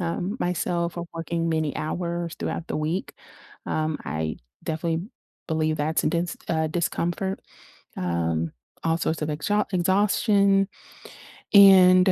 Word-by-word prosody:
um, 180 +4 -2
myself 175 -1 -1
or 170 - -3
working 165 0 -2
many 160 -3 0
hours 170 +1 -3
throughout 170 - -3
the - - -3
week, 155 +5 -2 0.5
um, 155 -1 -1
I 80 +1 -3 0.3
definitely 165 +1 -2 0.4
believe 155 -1 0
that's 155 +2 0
a - - +2
dense 170 +1 -1
uh, 160 -1 +1
discomfort, 175 +3 -2 0.6
um, 85 -2 -1 0.3
all 165 0 +2
sorts 160 -1 -1
of 150 - -1
exhau 205 +8 0
exhaustion, 195 +1 +3 0.9
and 185 -2 +8
170 Hz, 125 wpm, -25 LUFS, 155-185 Hz, 0.9 s, and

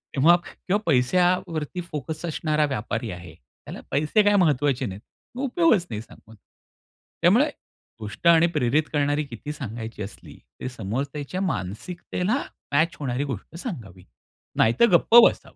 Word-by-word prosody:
तेव्हा 160 +6 +6
किंवा 195 +2 -2
पैश्यावरती 170 +3 +1
फोकस 155 0 -6
असणारा 155 -2 0
व्यापारी 115 -4 -3
आहे. 85 -2 -9 0.3
त्याला - - -8
"पैसे 155 +9 +2
काही 205 0 +4
महत्वाचे 145 -3 +1
नाहीत" 95 +1 -6 0.4
उपयोगच 260 - +3
नाही 105 -2 -4
सांगून. 110 -1 -16 0.9
त्यामुळे - - +4 0.5
गोष्ट 105 - -4
आणि 170 0 +6
प्रेरित 140 +4 +2
करणारी 145 +1 +1
किती 145 +1 -7
सांगायची 115 -5 -7
असली 100 - -11 0.2
ते - - -4
समोरच्याच्या 135 - -4
मानसिकतेला 180 - -2 0.3
मॅच 165 +5 +2
होणारी 135 -1 -2
गोष्ट 110 +8 -8
सांगावी 115 - -7 0.5
नाहीतर 115 - +4
गप्प 225 - +3
बसावं. - - -5
145 Hz, 125 wpm, -24 LUFS, 115-170 Hz, 0.9 s, तेव्हा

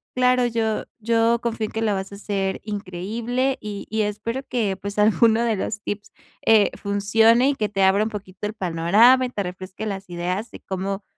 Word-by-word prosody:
claro, 250 0 +3
yo 225 -2 -1
yo 230 +1 +2
confío 230 -2 -2
en - - -7
que 225 - -3
lo 215 -2 +1
vas 190 0 -4
a - - -7
hacer 195 -1 -2
increíble, 220 +6 -2
y 205 -1 -6
y 220 +1 0
espero 230 +5 -3
que, 210 -6 -1
pues, 200 +2 -6
alguno 220 +2 +4
de 230 -2 +1
los 210 +2 -3
tips, 205 -1 -5 0.3
eh, 220 -2 +5
funcione 220 +5 +3
y 285 - 0
que 215 -5 -1
te 195 -2 0
abra 190 +2 +4
un 220 - -2
poquito 205 -1 -6
el 210 - -6
panorama, 210 +8 +4
te 205 -5 -3
refresque 185 +3 -7
las 195 -2 -5
ideas, 180 +5 -3
y - - -9
cómo, 195 +1 -4
210 Hz, 195 wpm, -23 LUFS, 195-230 Hz, 0.3 s, eh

